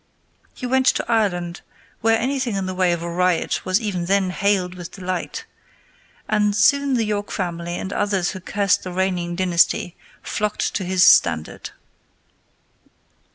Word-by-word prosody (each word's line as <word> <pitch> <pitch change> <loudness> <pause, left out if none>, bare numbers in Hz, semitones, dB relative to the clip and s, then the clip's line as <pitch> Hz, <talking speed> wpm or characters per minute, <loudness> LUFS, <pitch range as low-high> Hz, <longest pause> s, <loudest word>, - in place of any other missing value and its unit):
He 250 - -6
went 260 +1 +1
to - - +2
Ireland, 180 -7 0 0.4
where 225 0 +3
anything 255 -2 -1
in 195 -1 -2
the 185 - -3
way 185 -1 +2
of 170 -1 -2
a - - -4
riot 180 0 0
was 185 +2 +2
even 195 -6 -3
then 190 0 +1
hailed 190 -2 0
with 175 -2 -8
delight, 185 -2 -4 0.8
and 210 -1 +1
soon 275 +6 +3
the 235 - +1
York 205 -1 -2
family 175 -2 -3
and 190 - -5
others 200 -4 0
who 190 - -7
cursed 200 +2 +1
the 185 - -6
reigning 180 -2 -1
dynasty 175 -1 +1 0.3
flocked 210 0 -2
to 190 - -2
his 185 0 +3
standard. 75 0 +3
190 Hz, 155 wpm, -21 LUFS, 180-210 Hz, 0.8 s, where